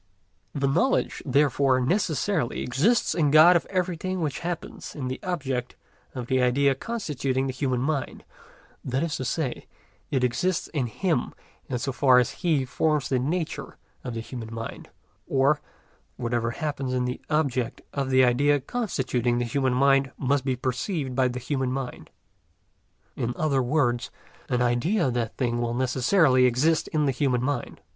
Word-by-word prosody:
The 140 Hz, -1 st, +1 dB
knowledge, 205 Hz, -, +1 dB
therefore, 135 Hz, -1 st, +3 dB
necessarily 160 Hz, -, 0 dB
exists 175 Hz, -, +2 dB
in 155 Hz, -4 st, +2 dB
God 155 Hz, +5 st, +8 dB
of 170 Hz, -, +1 dB
everything 185 Hz, 0 st, -2 dB
which 150 Hz, -5 st, -2 dB
happens 175 Hz, -1 st, -6 dB
in 130 Hz, -4 st, -4 dB
the 130 Hz, -, -4 dB
object 135 Hz, -9 st, -3 dB, 0.4 s
of 125 Hz, -2 st, -4 dB
the 130 Hz, +1 st, +1 dB
idea 135 Hz, +3 st, +3 dB
constituting 135 Hz, -, -2 dB
the 130 Hz, -, -2 dB
human 130 Hz, -2 st, -1 dB
mind; 140 Hz, 0 st, -2 dB, 0.6 s
that 130 Hz, +3 st, -1 dB
is 165 Hz, -3 st, -2 dB
to 130 Hz, -, -4 dB
say, 130 Hz, 0 st, -2 dB, 0.4 s
it 130 Hz, -3 st, 0 dB
exists 145 Hz, +9 st, 0 dB
in 140 Hz, -6 st, -1 dB
Him 160 Hz, -, -1 dB, 0.3 s
in 125 Hz, -, -1 dB
so 130 Hz, +3 st, -2 dB
far 130 Hz, -1 st, +4 dB
as 125 Hz, -2 st, +3 dB
He 155 Hz, -6 st, +2 dB
forms 150 Hz, +2 st, 0 dB
the 130 Hz, -, +2 dB
nature 160 Hz, +6 st, -3 dB, 0.3 s
of 120 Hz, -, -5 dB
the 115 Hz, -, -3 dB
human 115 Hz, -1 st, -7 dB
mind; 115 Hz, 0 st, -7 dB, 0.4 s
or, 140 Hz, +2 st, +2 dB, 0.6 s
whatever 120 Hz, -1 st, -1 dB
happens 135 Hz, 0 st, -3 dB
in 125 Hz, 0 st, 0 dB
the 125 Hz, -, -4 dB
object 135 Hz, -6 st, 0 dB
of 140 Hz, -2 st, -2 dB
the 130 Hz, 0 st, +5 dB
idea 145 Hz, +4 st, +3 dB
constituting 130 Hz, -, -1 dB
the 120 Hz, -, 0 dB
human 130 Hz, +1 st, 0 dB
mind 135 Hz, 0 st, +3 dB
must 140 Hz, 0 st, +1 dB
be 130 Hz, -2 st, 0 dB
perceived 130 Hz, -, -2 dB
by 130 Hz, 0 st, +2 dB
the 125 Hz, 0 st, -4 dB
human 130 Hz, 0 st, -2 dB
mind; 130 Hz, -1 st, -5 dB, 1.1 s
in 120 Hz, 0 st, -2 dB
other 145 Hz, -4 st, +1 dB
words, 120 Hz, -2 st, +1 dB, 0.4 s
an 125 Hz, 0 st, +1 dB
idea 135 Hz, -, +1 dB
of -, -, -2 dB
that 115 Hz, -2 st, -2 dB
thing 120 Hz, -2 st, 0 dB
will 120 Hz, 0 st, -1 dB
necessarily 130 Hz, +2 st, +3 dB
exist 140 Hz, +7 st, +2 dB
in 150 Hz, -1 st, 0 dB
the 135 Hz, -, +2 dB
human 125 Hz, -2 st, 0 dB
mind. 140 Hz, -2 st, -3 dB
135 Hz, 165 wpm, -26 LUFS, 125-150 Hz, 1.1 s, God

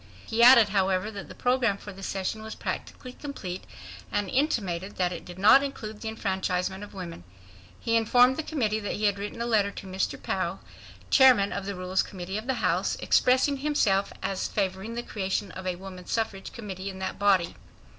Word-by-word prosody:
He 225 Hz, +1 st, 0 dB
added, 235 Hz, -3 st, +9 dB
however, 195 Hz, +1 st, +1 dB
that 200 Hz, -2 st, -8 dB
the -, -, -10 dB
program 245 Hz, -5 st, +1 dB
for 205 Hz, 0 st, -9 dB
the 195 Hz, -, -12 dB
session 195 Hz, +2 st, -3 dB
was 220 Hz, 0 st, -7 dB
practically 255 Hz, -1 st, -6 dB
complete 200 Hz, -11 st, -6 dB, 0.5 s
and 205 Hz, -2 st, -1 dB
intimated 200 Hz, -, 0 dB
that 180 Hz, -1 st, 0 dB
it -, -, -8 dB
did 175 Hz, 0 st, -10 dB
not 210 Hz, +8 st, +7 dB
include 220 Hz, -6 st, -6 dB
the 225 Hz, -, -5 dB
enfranchisement 190 Hz, -2 st, -2 dB
of 205 Hz, -, -11 dB
women. 170 Hz, -, -7 dB, 0.6 s
He 230 Hz, -, 0 dB
informed 245 Hz, +3 st, +5 dB
the 315 Hz, -, -2 dB
Committee 230 Hz, -9 st, -1 dB
that 205 Hz, -, -3 dB
he 210 Hz, -, -5 dB
had 200 Hz, -1 st, +2 dB
written 210 Hz, +3 st, -4 dB
a -, -, -2 dB
letter 215 Hz, -4 st, +2 dB
to 200 Hz, -, -9 dB
Mr. 190 Hz, 0 st, -2 dB
Pou, -, -, -2 dB, 0.5 s
Chairman 255 Hz, -7 st, +6 dB
of 200 Hz, -1 st, -4 dB
the 200 Hz, -, -3 dB
Rules 185 Hz, +1 st, 0 dB
Committee 190 Hz, +2 st, -5 dB
of 220 Hz, -, -10 dB
the 265 Hz, -, +1 dB
House, -, -, +1 dB
expressing 260 Hz, +3 st, +3 dB
himself 230 Hz, -9 st, +1 dB
as 195 Hz, -1 st, -1 dB
favoring 195 Hz, +3 st, -2 dB
the 240 Hz, -, -3 dB
creation 195 Hz, -2 st, -2 dB
of 185 Hz, 0 st, -7 dB
a 180 Hz, -, -1 dB
Woman 185 Hz, -1 st, -10 dB
Suffrage 210 Hz, -4 st, -2 dB
Committee 200 Hz, -4 st, -6 dB
in 190 Hz, -, -8 dB
that 190 Hz, -, -4 dB
body. 195 Hz, -4 st, +3 dB
200 Hz, 195 wpm, -27 LUFS, 190-230 Hz, 0.6 s, added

